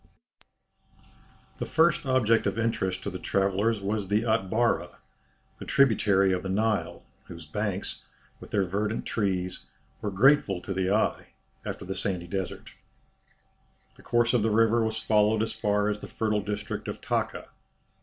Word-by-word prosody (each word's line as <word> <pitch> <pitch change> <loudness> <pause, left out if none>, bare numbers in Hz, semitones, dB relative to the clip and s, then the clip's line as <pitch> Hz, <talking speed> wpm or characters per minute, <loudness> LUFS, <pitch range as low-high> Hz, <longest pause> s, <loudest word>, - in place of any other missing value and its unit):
The - - -3
first 160 -3 +2
object 115 -4 +3
of - - -2
interest 95 -5 -1
to 100 - -3
the 90 - -6
travellers 100 +4 +1
was 100 0 -1
the 105 +3 +1
Atbara, 110 -4 0 0.6
a - - -7
tributary 100 -7 +3
of 90 - -1
the 95 - -5
Nile, 105 +2 -1 0.2
whose 85 -2 -10
banks, 100 +4 -3 0.4
with - - -12
their 100 -2 +1
verdant 105 +4 -2
trees, 95 -4 -2 0.4
were 105 - -2
grateful 100 -1 +4
to 95 - -4
the 95 0 0
eye 105 +2 +1 0.4
after - - -6
the 95 - -3
sandy 95 -2 -2
desert. 95 +1 -5 1.2
The - - -17
course 120 +1 +1
of 120 - +3
the 110 - +2
river 115 +1 +3
was 110 0 -1
followed 110 0 +2
as 110 - -3
far 105 0 +1
as 105 0 -1
the - - -8
fertile 110 -2 -1
district 105 0 -4
of - - -5
Taka. - - -2
105 Hz, 155 wpm, -27 LUFS, 95-110 Hz, 1.2 s, grateful